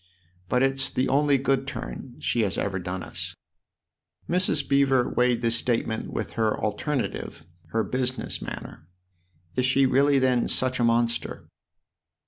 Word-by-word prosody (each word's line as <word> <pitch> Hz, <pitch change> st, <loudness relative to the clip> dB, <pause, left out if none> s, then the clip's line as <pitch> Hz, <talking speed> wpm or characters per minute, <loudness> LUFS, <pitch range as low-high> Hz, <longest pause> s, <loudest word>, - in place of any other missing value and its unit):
But 125 Hz, +1 st, +2 dB
it's 135 Hz, 0 st, +1 dB
the 130 Hz, +1 st, 0 dB
only 145 Hz, +1 st, +3 dB
good 135 Hz, 0 st, 0 dB
turn 130 Hz, -2 st, -6 dB
she 120 Hz, -, 0 dB
has 100 Hz, -3 st, 0 dB
ever 95 Hz, -2 st, -1 dB
done 90 Hz, +1 st, -4 dB
us." -, -, -4 dB, 0.9 s
Mrs. 170 Hz, -5 st, +1 dB
Beever 135 Hz, -2 st, +3 dB
weighed 125 Hz, -1 st, +1 dB
this 115 Hz, 0 st, +2 dB
statement 115 Hz, -2 st, -1 dB
with -, -, -3 dB
her 110 Hz, -2 st, 0 dB
alternative, 130 Hz, +6 st, -3 dB, 0.2 s
her 110 Hz, 0 st, 0 dB
business 130 Hz, +4 st, -1 dB
manner. 80 Hz, -, -8 dB, 0.3 s
" 90 Hz, -1 st, -37 dB
Is 125 Hz, 0 st, +2 dB
she 135 Hz, +1 st, +4 dB
really 140 Hz, +2 st, +4 dB
then 130 Hz, -2 st, +2 dB
such 130 Hz, 0 st, +1 dB
a -, -, +2 dB
monster 115 Hz, 0 st, 0 dB
125 Hz, 145 wpm, -26 LUFS, 115-135 Hz, 0.9 s, she